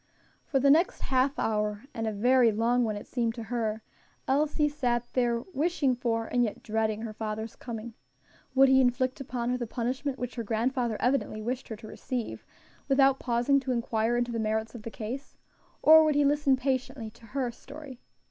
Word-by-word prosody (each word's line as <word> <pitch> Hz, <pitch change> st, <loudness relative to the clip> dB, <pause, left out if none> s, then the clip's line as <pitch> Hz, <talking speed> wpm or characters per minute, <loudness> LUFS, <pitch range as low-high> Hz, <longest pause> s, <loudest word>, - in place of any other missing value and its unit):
For 270 Hz, -, +1 dB
the 275 Hz, +1 st, +5 dB
next 330 Hz, +5 st, +3 dB
half 265 Hz, +1 st, +1 dB
hour 210 Hz, 0 st, -1 dB
and 225 Hz, -3 st, -3 dB
a -, -, 0 dB
very 240 Hz, +3 st, +4 dB
long 235 Hz, +3 st, +2 dB
one 215 Hz, -2 st, -1 dB
it 205 Hz, -, -7 dB
seemed 230 Hz, -2 st, -1 dB
to 230 Hz, -, -6 dB
her 220 Hz, -2 st, -1 dB, 0.4 s
Elsie 295 Hz, +2 st, +2 dB
sat 245 Hz, -5 st, -1 dB
there 240 Hz, -2 st, +1 dB
wishing 300 Hz, -3 st, +1 dB
for, 230 Hz, -2 st, -1 dB
and 245 Hz, +1 st, +1 dB
yet 220 Hz, -, -3 dB
dreading 220 Hz, 0 st, -1 dB
her 220 Hz, -2 st, -5 dB
father's 220 Hz, 0 st, -5 dB
coming. 230 Hz, -1 st, -7 dB, 0.6 s
Would 270 Hz, +1 st, +7 dB
he 265 Hz, 0 st, +6 dB
inflict 255 Hz, +1 st, +1 dB
upon 245 Hz, -2 st, -2 dB
her 250 Hz, -, -1 dB
the 240 Hz, -, -3 dB
punishment 260 Hz, +4 st, -2 dB
which 245 Hz, -1 st, -4 dB
her 235 Hz, -, -2 dB
grandfather 230 Hz, +1 st, 0 dB
evidently 250 Hz, -4 st, 0 dB
wished 250 Hz, +3 st, -3 dB
her 220 Hz, -, -5 dB
to 215 Hz, +1 st, -11 dB
receive, 245 Hz, +1 st, -5 dB, 0.4 s
without 270 Hz, -1 st, +4 dB
pausing 245 Hz, +3 st, +2 dB
to 265 Hz, -1 st, -3 dB
inquire 235 Hz, -1 st, 0 dB
into 240 Hz, 0 st, 0 dB
the 230 Hz, -, -2 dB
merits 220 Hz, 0 st, -1 dB
of 240 Hz, -, -8 dB
the 230 Hz, -, -6 dB
case? 235 Hz, +5 st, -7 dB, 0.5 s
or 315 Hz, 0 st, +9 dB
would 305 Hz, -2 st, +2 dB
he 290 Hz, 0 st, +4 dB
listen 285 Hz, -1 st, +3 dB
patiently 260 Hz, -3 st, -2 dB
to 230 Hz, 0 st, -17 dB
her 250 Hz, -3 st, 0 dB
story? 275 Hz, +1 st, -11 dB
245 Hz, 190 wpm, -28 LUFS, 225-270 Hz, 0.6 s, or